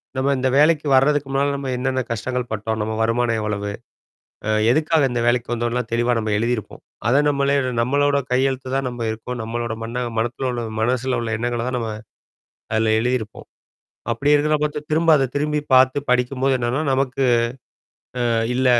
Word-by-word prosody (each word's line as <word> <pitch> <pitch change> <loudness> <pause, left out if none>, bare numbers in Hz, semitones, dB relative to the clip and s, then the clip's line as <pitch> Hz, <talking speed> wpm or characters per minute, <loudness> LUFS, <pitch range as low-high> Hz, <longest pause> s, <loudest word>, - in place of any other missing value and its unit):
நம்ம 135 +1 +1
இந்த 130 - 0
வேலைக்கு 150 0 +4
வர்றதுக்கு 140 +1 +3
முன்னால, 140 +1 +1
நம்ம 135 -2 -4
என்னன்ன 130 0 -1
கஷ்டங்கள் 125 +2 -3
பட்டோம்? 110 +1 -2
நம்ம 110 +1 -2
வருமானம் 115 0 +1
எவ்வளவு? 105 -1 -3 0.8
அ - - 0 0.2
எதுக்காக 155 0 +2
இந்த 120 -1 -1
வேலைக்கு 120 0 +1
வந்தோன்லாம் 120 0 -2
தெளிவா 120 +1 +2
நம்ம 110 -1 -2
எழுதியிருப்போம். 115 -1 -2 0.3
அதை 135 +4 +4
நம்மளே 140 0 +1 0.3
நம்மளோட 140 +3 +2
கையெழுத்து 130 0 0
தான் 135 -1 0
நம்ம 120 -2 -4
இருக்கோம். 120 +2 -6
நம்மளோட 120 0 -3
மண்ண 115 +2 -5 0.2
மனத்துல 120 +3 -1
உள்ள 120 -1 -3 0.2
மனசுல 125 +2 0
உள்ள 115 - -3
எண்ணங்கள 120 0 -2
தான் 130 -1 -1
நம்ம, 115 -2 -3 0.8
அதில 110 0 +2
எழுதியிருப்போம். 120 -3 -2 0.7
அப்படி 140 +6 +1
இருக்கிறத 150 +1 +3
பாத்து 150 0 -1
திரும்ப 165 +2 +2
அத 135 - +2
திரும்பி 150 +1 0
பாத்து 130 +1 +5
படிக்கும்போது 130 +2 +1
என்னன்னா, 120 +4 0
நமக்கு 135 0 0 1.1
ஆ, - - +1 0.2
இல்ல. 130 +1 +1
125 Hz, 160 wpm, -21 LUFS, 115-135 Hz, 1.1 s, பாத்து